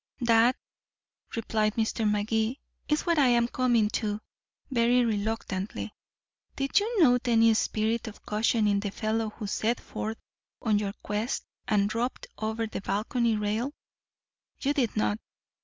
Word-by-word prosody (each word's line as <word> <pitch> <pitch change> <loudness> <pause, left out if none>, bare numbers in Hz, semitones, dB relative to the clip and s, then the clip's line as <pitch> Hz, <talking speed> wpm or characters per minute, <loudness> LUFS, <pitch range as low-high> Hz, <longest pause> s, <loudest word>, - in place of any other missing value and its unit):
"That," 235 +1 +5 0.8
replied 215 -2 0
Mr. 220 -1 +1
Magee, 220 +4 0 0.3
"is 300 0 +1
what 340 -3 +3
I'm 240 -3 +4
coming 240 -3 +2
to 210 -1 -2 0.5
very 245 0 +4
reluctantly. 210 -2 -2 0.6
Did 275 +6 +2
you 425 -2 +2
note 250 -3 +4
any 230 -1 +5
spirit 220 +2 0
of 215 - -10
caution 215 0 +2
in 200 -1 +3
the 200 0 -2
fellow 220 +2 -1
who 215 0 -7
set 220 +3 0
forth 220 +1 -5 0.4
on 215 -3 +2
your 200 -1 -2
quest, 210 +5 -2 0.2
and 205 -2 +3
dropped 230 +4 -2
over 220 +1 -1
the 215 - -5
balcony 220 +4 0
rail? 220 +7 -1 0.8
You 285 +1 +1
did 250 -7 0
not. 215 0 +1
225 Hz, 140 wpm, -28 LUFS, 215-240 Hz, 0.8 s, That